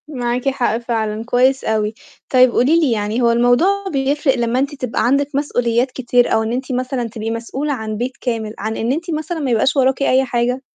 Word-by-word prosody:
معاكِ 250 -2 -1
حق 250 -4 0
فعلًا، 225 -2 -2
كويس 255 +2 +2
أوي. 215 -1 0 0.4
طيب 255 -2 +5
قولي 285 +9 +3
لي 300 -6 +2
يعني 215 +2 -1
هو 235 -1 +4
الموضوع 245 +13 +2
بيفرق 275 0 +1
لمّا 240 0 0
أنتِ 280 +2 -1
تبقى 255 -4 -2
عندِك 275 +3 +2
مسؤوليات 245 -3 0
كتير 245 -1 +1
أو 220 - +2
إن 220 - -3
أنتِ 260 +2 -3
مثلًا 255 -1 -2
تبقي 225 0 -5
مسؤولة 260 +6 -3
عن 220 -4 -4
بيت 255 +4 -4
كامل، 225 -4 -3
عن 220 +2 -3
إن 230 +2 -1
أنتِ 330 +4 -3
مثلًا 320 +2 -3
ما 275 -4 -1
يبقاش 235 +5 +2
وراكِ 265 +1 +2
أي 265 -1 +3
حاجة؟ 245 +1 -1
250 Hz, 200 wpm, -18 LUFS, 230-270 Hz, 0.4 s, طيب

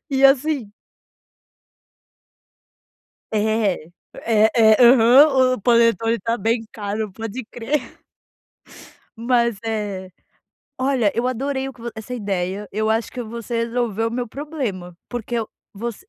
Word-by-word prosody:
E 270 0 +2
assim 275 -4 +3 2.6
É 215 -2 +1 0.5
é 220 -1 +4
é 220 0 +5
aham, 255 +2 +6
o 210 - -12
panetone 230 -1 +3
tá 230 +4 -1
bem 225 +3 0
caro, 210 -1 -4
pode 225 +4 -6
crer. 255 +7 -4 1.1
Mas 235 -2 +1
é 205 -4 -4 0.7
olha, 255 -5 +1
eu 240 +2 0
adorei 265 +2 -2
o - - -11
que 245 - -17
voc 235 -1 -5
essa 220 +3 -7
ideia 200 -2 -3
eu 215 +2 -1
acho 225 0 0
que 250 - -5
você 230 +1 -3
resolveu 230 -2 -1
o - - -4
meu 245 0 -3
problema, 225 - -5
porque 240 0 -5
eu 225 -2 -1 0.3
voc 230 +2 -5
230 Hz, 125 wpm, -21 LUFS, 215-250 Hz, 2.6 s, aham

